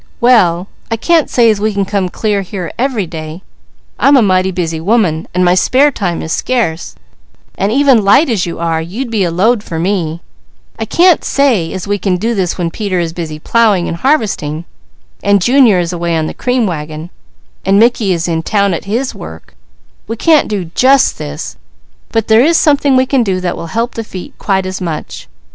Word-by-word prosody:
"Well 195 -8 +3 0.2
I 225 - -1
can't 330 +5 +2
say 235 -2 +4
as 205 -2 -3
we 215 -1 -1
can 200 -1 0
come 195 -2 -1
clear 205 +1 -1
here 185 -2 -6
every 245 -5 -1
day; 160 +1 -8 0.6
I'm 275 +2 +5
a 190 -6 +3
busy 165 -3 -3
woman, 185 -5 +1
and 180 0 +1
my 175 - +4
spare 265 +10 +3
time 180 -9 -3
is 160 - -3
scarce; 215 - -2 0.6
and 195 +2 -1
even 265 -3 +4
light 205 +11 +4
as 215 -8 -1
you 170 - -5
are, 165 -1 -1
you'd 225 +10 -5
be 215 -4 +1
a 175 - 0
load 205 +7 +1
for 170 -5 -6
me; 170 -2 -2 0.6
I 225 - -2
can't 350 - +3
say 240 -13 +1
as 190 +1 -6
we 205 0 -1
can 185 -1 0
do 225 +6 -1
this 185 -5 -1
when 170 -2 -2
Peter 200 -3 -2
is 165 -1 -2
busy 160 -3 -5
plowing 205 +1 +1
and 170 - -4
harvesting 185 - -1 0.6
and 200 0 +3
Junior 240 0 +4
is 175 0 -1
away 170 -1 -1
on 160 - -1
the - - -5
cream 250 -1 0
wagon, 155 -2 -5 0.5
and 195 +1 +2
Mickey 225 -2 +3
is 170 -1 -1
in 165 -1 -1
town 200 +2 0
at 170 - -5
his 235 +6 -2
work; 80 +1 -11 0.5
we 225 - -3
can't 310 +5 +3
do 190 -6 -4
just 265 +1 +3
this; 70 0 -6 0.5
but 225 -1 -1
there 220 +2 +5
is 330 +3 +3
something 285 -2 +3
we 260 0 +3
can 265 -1 +1
do 190 -5 -1
that 180 -1 -2
will 165 - -7
help 230 +7 -2
the 230 - -5
feet 185 -4 -9
quite 190 -2 0
as 185 +1 -5
much. 165 - -5
195 Hz, 200 wpm, -13 LUFS, 170-235 Hz, 0.6 s, I'm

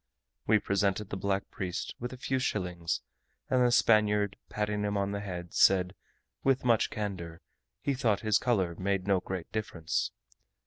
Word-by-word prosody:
We 110 - +6
presented 100 0 0
the - - -2
black 100 0 -1
priest 90 -2 -4
with 120 0 -4
a 130 - -8
few 130 +1 -1
shillings, 90 -8 -1 0.5
and 130 -1 +4
the 120 - +4
Spaniard, 105 -3 +4
patting 105 0 -1
him 105 0 0
on 100 0 0
the 100 - -2
head, 90 -4 -6
said, 90 -1 +4 0.5
with 135 -1 +2
much 115 -3 +3
candour, 90 -6 -4 0.4
he 140 - +1
thought 115 -6 +1
his 110 -2 +3
colour 95 -9 +1
made 95 +1 -1
no 100 -2 +3
great 90 -1 -5
difference. 90 -7 -2
100 Hz, 165 wpm, -30 LUFS, 95-110 Hz, 0.5 s, We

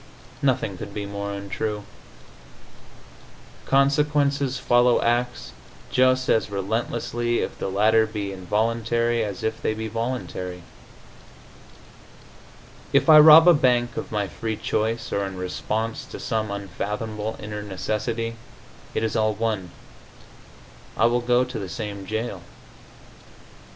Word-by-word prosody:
Nothing 115 -8 0
could 100 -1 -8
be 105 -1 -3
more 100 0 -5
untrue. 100 +1 -4 1.8
Consequences 140 -1 +2
follow 120 -1 +3
acts 120 0 -1 0.4
just 130 0 +3
as 110 - +2
relentlessly 120 +4 -1
if - - -5
the - - -2
latter 110 +3 +3
be 105 -2 -4
involuntary 115 +4 0
as 100 -3 -5
if 110 0 -2
they 110 - -1
be 110 0 -4
voluntary. 110 -6 -4 2.3
If - - +3
I 155 -1 +10
rob 160 +2 +9
a 175 - +9
bank 120 -4 +2
of - - -5
my 105 -2 -1
free 110 +2 -4
choice 115 +2 -2
or 100 - 0
in 95 -1 -5
response 110 +5 -3
to - - -9
some 110 -2 -2
unfathomable 105 +2 -4
inner 105 0 -6
necessity, 110 +3 -3 0.6
it - - 0
is 110 -1 -1
all 110 -1 +1
one; 105 -4 -2 1.3
I 110 - +4
will 120 +1 +2
go 120 +1 +3
to 125 -2 -5
the 95 -3 -6
same 100 -4 -6
jail. 110 -3 -3
110 Hz, 125 wpm, -24 LUFS, 105-120 Hz, 2.3 s, I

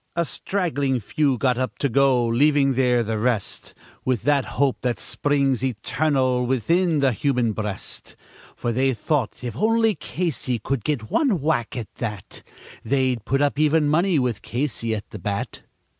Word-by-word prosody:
A 170 0 +1
straggling 145 -10 -1
few 135 +4 0
got 125 +1 +1
up 130 - -2
to 140 - +1
go, 130 -1 +3
leaving 135 +3 +3
there 125 -2 +2
the 110 -1 -2
rest 115 -3 -2 0.3
With 125 -5 0
that 140 -1 +2
hope 135 -1 +2
that 125 -1 -1
springs 140 -3 0
eternal 130 +1 0
within 160 +6 +2
the 135 -1 +4
human 125 -1 0
breast; 105 -2 -5 0.4
For 120 - -2
they 130 +2 +1
thought 130 +1 -1
if 120 -3 -4
only 225 - +3
Casey 150 -5 -2
could 120 +1 -3
get 125 -7 -2
one 255 - +2
whack, 140 -5 -1
at 115 -3 -6
that 105 -5 -6 0.4
They'd 130 -2 0
put 135 +2 +1
up 145 0 0
even 155 0 +3
money, 170 +3 +3
with 125 -6 0
Casey 120 -3 -2
at 105 - -6
the 105 - -7
bat. 100 +2 -4
130 Hz, 160 wpm, -23 LUFS, 120-145 Hz, 0.4 s, the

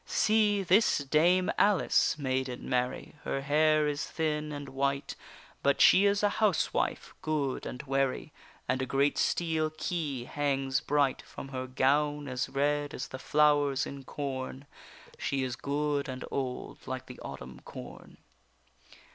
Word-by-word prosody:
See, 210 -2 +3
this 190 +5 +4
dame 165 +6 +3
Alice, 200 -6 +3
maiden 130 -3 -2
Mary, 125 +1 -1
Her 135 - -2
hair 155 +2 +3
is 145 0 -1
thin 150 -1 -2
and 145 -1 -6
white, 140 +1 -1 0.5
But 140 0 +2
she 195 - +7
is 200 +1 +1
a 205 - +5
housewife 205 -6 +1
good 150 -4 -1
and 125 +4 -6
wary, 135 +1 -1 0.3
And 130 0 0
a 130 - -2
great 140 +3 +1
steel 160 -2 +1
key 155 -5 -3
hangs 135 0 0
bright 145 -2 +1
From 135 - -10
her 130 -1 -4
gown, 145 +3 +1
as 130 0 -2
red 145 +1 0
as - - -5
the 130 - -7
flowers 145 -2 +3
in 140 -1 -8
corn; 135 0 -5 0.5
She 135 -1 -1
is 125 -2 -2
good 145 0 -1
and 130 0 -5
old 130 -2 -4
like 130 0 -4
the 125 - -11
autumn 65 -2 -8
corn. - - -11
140 Hz, 145 wpm, -30 LUFS, 130-150 Hz, 0.5 s, she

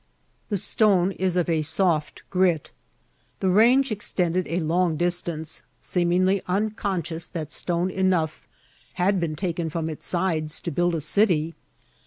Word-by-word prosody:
The 205 - 0
stone 195 -1 +3
is 185 -1 -1
of 175 - +1
a 165 -2 +1
soft 160 0 0
grit. 180 -5 +1 0.7
The 190 - +1
range 240 +6 +5
extended 185 -4 -1
a 165 - -2
long 170 0 +1
distance, 170 -2 -1 0.2
seemingly 185 +2 +1
unconscious 185 -4 -2
that 155 -4 -6
stone 175 +3 -1
enough 185 -4 0 0.5
had 185 +2 +1
been 165 -3 -2
taken 170 -1 -2
from 160 0 -3
its 155 - -6
sides 165 -3 -1
to 170 - -2
build 175 +2 +1
a 160 - -2
city. 165 -1 +2
175 Hz, 140 wpm, -24 LUFS, 160-190 Hz, 0.7 s, range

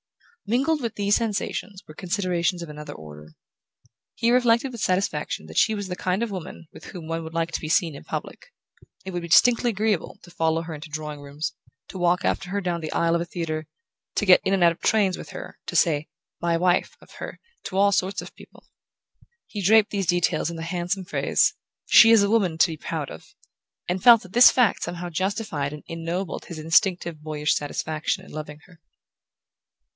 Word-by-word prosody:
Mingled 275 +7 +1
with 230 -2 -3
these 205 0 +2
sensations 210 -2 -3
were 155 - -11
considerations 180 -1 -1
of - - -8
another 150 0 -8
order. 75 0 -12 0.8
He 230 - +1
reflected 245 +1 +3
with 235 -4 -8
satisfaction 180 - -1
that 80 0 -10
she 220 - +3
was 205 -2 -4
the 180 - -4
kind 185 +4 -1
of 230 - -3
woman 170 -3 -8
with - - -13
whom 170 -3 -9
one 165 0 -3
would 160 +1 -9
like 165 0 -1
to - - -3
be 155 - -5
seen 165 -2 +2
in - - -10
public. - - -6 0.6
It 190 - -5
would 175 -1 -3
be 170 - -6
distinctly 240 +7 +5
agreeable 210 -4 -1
to 175 - -14
follow 165 0 0
her 165 -1 -7
into 155 +1 -9
drawing 150 -1 -6
rooms, 145 +3 -5 0.4
to 190 - -7
walk 175 0 +2
after 180 - -1
her 200 +2 -1
down 175 -3 -2
the 155 - -5
aisle 170 0 +1
of 170 - 0
a - - -2
theatre, 160 -2 -4 0.5
to 205 - 0
get 185 -2 +7
in 195 - +1
and 185 - +1
out 170 - +6
of 165 - -10
trains 200 -4 +2
with - - -9
her, - - -9
to - - -5
say 155 -3 +2 0.3
"my 170 -1 +1
wife" 180 +1 +1
of - - -19
her - - -7 0.3
to 190 - -4
all 200 +1 +5
sorts 190 0 0
of - - -12
people. - - -17 0.8
He 205 - -6
draped 210 +2 +5
these 195 -3 -2
details 175 -1 +1
in 170 - -6
the 165 - -5
handsome 180 +2 -3
phrase - - +2 0.3
"She's 225 -2 +7
a 200 - +1
woman 195 -7 +2
to 160 - +5
be 160 - -6
proud 155 -2 -4
of", 80 - -13 0.5
and 180 +1 -2
felt 235 -3 +8
that 185 0 -14
this 245 +1 +9
fact 245 -4 +2
somehow 175 0 -5
justified 185 -5 -2
and 150 0 -9
ennobled 165 +2 -4
his 170 - -8
instinctive 165 0 +1
boyish 150 -1 0
satisfaction 155 +5 -3
in - - -14
loving 150 -1 -7
her. 175 -2 -20
175 Hz, 205 wpm, -24 LUFS, 160-200 Hz, 0.8 s, this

